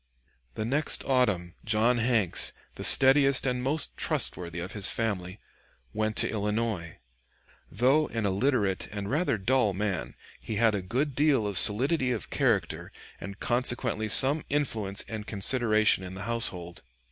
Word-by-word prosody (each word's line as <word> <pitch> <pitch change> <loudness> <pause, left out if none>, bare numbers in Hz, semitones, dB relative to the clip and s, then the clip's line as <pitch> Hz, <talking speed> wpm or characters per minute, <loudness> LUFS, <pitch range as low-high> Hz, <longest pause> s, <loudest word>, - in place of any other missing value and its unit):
The 110 - -4
next 145 +6 +1
autumn, 105 -10 0
John 115 +2 +1
Hanks, 115 -6 +1 0.2
the - - -9
steadiest 135 0 +5
and 125 -1 -1
most 145 +5 0
trustworthy 85 -1 -1
of 90 +2 -6
his 100 -2 +3
family, 95 -4 -3 0.5
went 110 0 -2
to - - +1
Illinois. 105 -5 -3 0.7
Though 130 - +2
an 115 -2 -4
illiterate 100 -1 -1
and 100 0 -6
rather 150 -4 0
dull 110 -1 0
man, 100 -3 -4 0.2
he 110 - -6
had 115 +1 +2
a 100 - -2
good 130 +10 -3
deal 140 -5 +1
of 100 -1 -4
solidity 130 - +2
of 110 -6 -5
character - - -1 0.3
and 100 0 -9
consequently 120 -3 +1
some 140 +8 +6
influence 110 -9 -2
and 110 -2 -7
consideration 110 -1 +1
in 90 0 -8
the 95 - -7
household. 90 -6 -2
110 Hz, 145 wpm, -27 LUFS, 100-130 Hz, 0.7 s, some